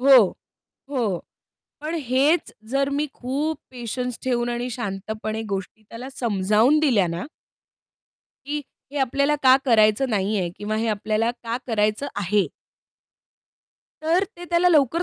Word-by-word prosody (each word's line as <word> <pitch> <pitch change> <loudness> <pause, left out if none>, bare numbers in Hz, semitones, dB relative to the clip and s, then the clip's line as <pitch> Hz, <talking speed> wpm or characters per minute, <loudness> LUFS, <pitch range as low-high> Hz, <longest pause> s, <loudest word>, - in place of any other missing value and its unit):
हो, 270 +1 +8 0.7
हो. 230 -10 0 0.6
पण 310 +3 -3
हेच 270 +7 +2 0.2
जर 275 +1 +1
मी 290 +2 0
खूप 285 +5 -2
पेशन्स 250 0 -4
ठेऊन 240 -2 0
आणि 240 +1 -2
शांतपणे 215 0 -4
गोष्टी 195 +2 -4
त्याला 245 +3 -7
समजावून 220 +4 +2
दिल्या 235 -11 +3
ना 170 +6 -4 1.2
की 295 +1 -2 0.3
हे 290 - -2
आपल्याला 280 +3 +2
का 260 -1 +8
करायचं 225 +1 +4
नाहीये 195 -2 0
किंवा 215 +1 -3
हे 225 +1 0
आपल्याला 215 +2 0
का 235 -1 -4
करायचं 215 +3 +1
आहे? 205 0 +2 1.6
तर 340 +5 +3
ते 350 - -8
त्याला 345 +1 +3
लवकर 320 +1 +3
240 Hz, 130 wpm, -23 LUFS, 215-280 Hz, 1.6 s, हो